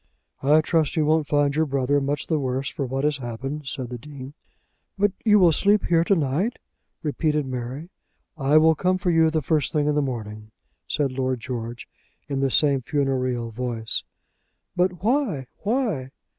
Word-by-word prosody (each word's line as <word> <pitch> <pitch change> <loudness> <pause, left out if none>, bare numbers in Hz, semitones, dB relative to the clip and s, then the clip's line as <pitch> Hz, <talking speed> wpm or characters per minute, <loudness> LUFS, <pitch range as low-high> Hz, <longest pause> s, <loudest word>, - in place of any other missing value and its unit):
"I 150 +3 +5
trust 155 -1 +1
you 155 -2 +2
won't 155 -1 +2
find 145 -1 +2
your 160 0 +2
brother 140 +1 +1
much 140 +1 -2
the 160 -2 0
worse 135 0 -2
for 140 - -4
what 135 +2 -2
has 150 -1 +1
happened," 135 +4 -5
said 130 -2 -4
the 125 -1 -6
Dean. 140 0 -10 0.6
"But 205 +1 +3
you 210 -2 +5
will 180 -4 +6
sleep 200 +5 +3
here 165 -1 +3
to 195 - +3
night," 160 - 0 0.5
repeated 150 -1 0
Mary. 130 +6 -5 0.4
"I 145 0 +3
will 160 +1 +6
come 185 +4 +1
for 185 -1 0
you 165 -1 +4
the 155 -1 -1
first 150 +1 +1
thing 150 -2 +1
in 150 - +2
the 150 - +2
morning," 110 -5 -5 0.4
said 145 -3 0
Lord 130 -1 -1
George 120 -1 -6 0.4
in 140 -2 -2
the 135 0 +2
same 140 0 +3
funereal 130 -3 -1
voice. 115 -1 -2 0.7
"But 180 0 0
why; 225 - +1
why?" 210 - -1
145 Hz, 175 wpm, -24 LUFS, 130-160 Hz, 0.7 s, will